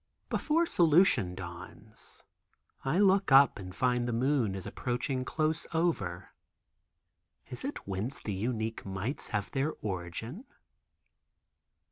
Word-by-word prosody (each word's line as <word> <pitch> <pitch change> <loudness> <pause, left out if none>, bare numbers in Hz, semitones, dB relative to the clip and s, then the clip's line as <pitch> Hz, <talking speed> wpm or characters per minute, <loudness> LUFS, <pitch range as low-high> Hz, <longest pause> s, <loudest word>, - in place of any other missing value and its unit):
Before 325 +3 +2
solution 160 - +4
dawns 95 +4 -7 0.6
I 135 +6 +1
look 195 -3 +4
up 135 -3 +7
and 90 -1 -8
find 125 0 +1
the - - -1
moon 120 -4 +1
is 95 - -5
approaching 130 +1 -2
close 155 +3 -1
over. 105 - -1 1.2
Is - - -2
it - - -5
whence 100 +7 -2
the 105 - -4
unique 110 +2 -2
mites 100 +8 -3
have 105 -3 -2
their 145 +3 0
origin? 105 - -4
120 Hz, 115 wpm, -31 LUFS, 100-155 Hz, 1.2 s, up